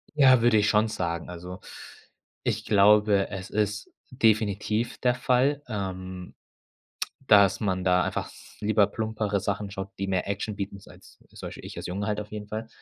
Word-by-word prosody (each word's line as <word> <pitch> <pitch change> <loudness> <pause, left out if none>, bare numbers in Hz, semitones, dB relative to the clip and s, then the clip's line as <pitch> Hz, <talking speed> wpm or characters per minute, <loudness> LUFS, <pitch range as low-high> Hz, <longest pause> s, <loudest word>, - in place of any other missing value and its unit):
Ja, 130 -5 +6
würde 120 -2 +5
ich 105 0 +3
schon 110 +1 +3
sagen. 85 -5 -3
Also, 90 +1 -8 0.8
ich - - -1
glaube, 105 0 +4
es 95 -2 -6
ist 105 0 -1 0.2
definitiv 110 -1 +1
der 125 -1 +2
Fall, 130 +3 +1
ähm, 95 -3 -5 0.9
dass 100 -7 +5
man 95 -3 -1
da 90 0 +4
einfach - - -3 0.3
lieber 105 -1 +3
plumpere 105 -1 -2
Sachen 100 +1 -3
schaut, 95 0 -6
die 100 - -2
mehr 95 0 -1
Action 100 +2 -3
bieten, 100 0 -5
sei - - -15
es - - -19
also - - -24
zum - - -7
Beispiel, - - -10
ich - - -9
als - - -5
Junge 100 +4 -3
halt 105 0 -1
auf 105 - -8
jeden 105 -1 -6
Fall. 110 +1 -5
105 Hz, 180 wpm, -26 LUFS, 95-110 Hz, 0.9 s, Ja